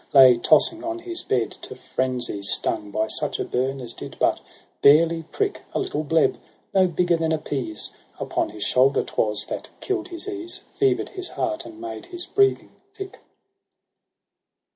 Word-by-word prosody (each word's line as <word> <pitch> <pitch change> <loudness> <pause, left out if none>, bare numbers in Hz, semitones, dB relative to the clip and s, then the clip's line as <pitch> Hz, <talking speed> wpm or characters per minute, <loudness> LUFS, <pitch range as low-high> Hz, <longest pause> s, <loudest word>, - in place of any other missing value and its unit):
Lay 130 -2 +9
tossing 325 - +4
on 335 0 -3
his 345 0 -6
bed, 120 -3 0
to - - -8
frenzy 125 -5 -2
stung 105 +1 0
By 110 +2 0
such - - 0
a - - -1
burn 135 +2 -1
as 120 -2 -6
did - - -9
but - - +2 0.4
barely 165 +3 +6
prick: 410 -1 -1
A - - +2
little 380 - -2
bleb, 160 +1 +2 0.4
no 190 -1 +5
bigger 175 0 +2
than 160 -1 0
a 160 - +2
pease. 130 -8 -3 0.3
Upon - - -1
his 105 -1 -6
shoulder 130 +2 +3
'twas, 105 -1 -1
that - - -5
kill'd 370 -3 -2
his 350 +1 -4
ease, 360 -3 -5
Fever'd 405 -1 +1
his 375 -2 -2
heart, 330 0 -2
and 330 0 -12
made 345 0 -7
his 350 0 -6
breathing 400 -1 +2 0.2
thick. 390 -2 -8
165 Hz, 165 wpm, -24 LUFS, -, 0.4 s, Lay